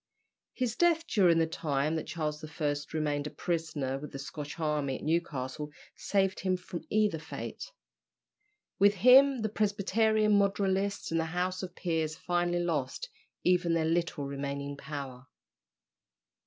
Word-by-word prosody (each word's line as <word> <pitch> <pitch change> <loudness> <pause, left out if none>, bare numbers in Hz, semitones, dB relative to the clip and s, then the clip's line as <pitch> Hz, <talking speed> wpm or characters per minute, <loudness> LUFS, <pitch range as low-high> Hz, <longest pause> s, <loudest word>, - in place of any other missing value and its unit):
His 245 -3 -1
death 335 -1 +3
during 180 - +4
the 165 - +4
time 155 -1 -1
that 160 - -3
Charles 155 -2 -3
I. 150 -1 -1 0.2
remained 150 -2 -1
a - - -4
prisoner 155 -7 -2
with 150 0 -8
the - - -6
Scotch 145 +3 -7
army 150 -4 0
at - - -12
Newcastle 150 -3 -2 0.3
saved 195 -1 0
him 185 -1 0
from 180 -1 -7
either 210 -6 +2
fate. 160 - -7 1.1
With 200 +1 +5
him 255 +4 +6
the 215 - 0
Presbyterian 210 0 +2
moderatists 200 -1 0
and 165 - +1
the 165 - 0
House 180 +2 -2
of 185 -2 -7
Peers 160 -3 -1
finally 175 0 0
lost 165 - -2 0.3
even 175 -2 +3
their 160 -1 +1
little 165 -2 0
remaining 140 0 -4
power. 140 -3 -7
165 Hz, 140 wpm, -30 LUFS, 150-195 Hz, 1.1 s, him